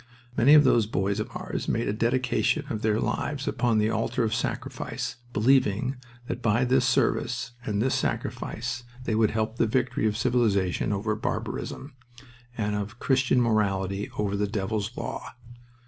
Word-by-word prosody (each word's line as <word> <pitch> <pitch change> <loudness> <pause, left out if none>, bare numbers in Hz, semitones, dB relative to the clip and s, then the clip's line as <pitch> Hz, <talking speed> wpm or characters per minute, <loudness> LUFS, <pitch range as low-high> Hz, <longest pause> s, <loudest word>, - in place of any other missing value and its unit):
Many 140 +6 +6
of 150 - +8
those 120 -5 +4
boys 100 -1 0
of 105 - -3
ours - - -4
made 115 - 0
a 100 - 0
dedication 130 +6 +1
of 110 - -3
their 110 0 +2
lives 140 +2 -2
upon 120 -3 +1
the 110 +1 +2
altar 115 +2 0
of 110 -1 0
sacrifice, 120 +1 -3
believing 125 +1 +2 0.3
that 120 - -4
by 115 +2 +2
this 130 0 +3
service 125 0 +1
and 105 -3 -1
this 130 - +1
sacrifice 120 +2 -2 0.2
they 115 - -1
would 110 -1 +3
help 110 +1 -2
the 115 - +3
victory 125 -1 +1
of 105 0 -1
civilization 110 -7 +1
over 105 +2 -1
barbarism, 135 +5 -4 0.6
and 105 -2 -1
of 105 +3 -4
Christian 130 0 +2
morality 100 -4 +1
over 100 -1 0
the 105 +1 0
devil's 105 0 -2
law. - - -5
110 Hz, 160 wpm, -27 LUFS, 105-125 Hz, 0.6 s, of